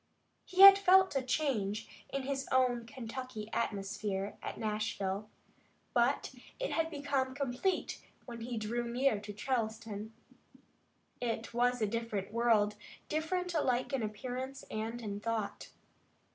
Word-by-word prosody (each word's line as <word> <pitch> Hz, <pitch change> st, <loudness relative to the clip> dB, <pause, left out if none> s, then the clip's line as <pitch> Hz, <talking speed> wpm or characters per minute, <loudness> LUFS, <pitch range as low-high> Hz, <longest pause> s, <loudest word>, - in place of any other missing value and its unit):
He 375 Hz, +1 st, +1 dB
had 395 Hz, 0 st, +12 dB
felt 380 Hz, -3 st, +5 dB
a 270 Hz, -, +2 dB
change 235 Hz, -6 st, -1 dB, 0.2 s
in 275 Hz, -1 st, -2 dB
his 270 Hz, 0 st, -2 dB
own 245 Hz, -3 st, +2 dB
Kentucky 250 Hz, -3 st, -6 dB
atmosphere 200 Hz, -2 st, -2 dB
at -, -, -5 dB
Nashville, 210 Hz, -2 st, -2 dB, 0.6 s
but 245 Hz, +3 st, +2 dB, 0.3 s
it -, -, -2 dB
had 325 Hz, 0 st, +1 dB
become 280 Hz, -3 st, -1 dB
complete 280 Hz, +7 st, -1 dB, 0.2 s
when 235 Hz, -2 st, -8 dB
he 235 Hz, 0 st, -4 dB
drew 235 Hz, +2 st, -2 dB
near 245 Hz, -3 st, +2 dB
to 205 Hz, 0 st, -7 dB
Charleston. 220 Hz, -2 st, -3 dB, 1.1 s
It 230 Hz, -2 st, -2 dB
was 245 Hz, 0 st, +2 dB
a -, -, +5 dB
different 215 Hz, -2 st, -3 dB
world, 220 Hz, -3 st, +3 dB, 0.3 s
different 355 Hz, +3 st, -1 dB
alike 260 Hz, -4 st, +1 dB
in 270 Hz, -, +1 dB
appearance 255 Hz, +5 st, -4 dB
and 225 Hz, +2 st, -3 dB
in 205 Hz, -1 st, -4 dB
thought. 220 Hz, -1 st, -3 dB
240 Hz, 130 wpm, -33 LUFS, 215-270 Hz, 1.1 s, had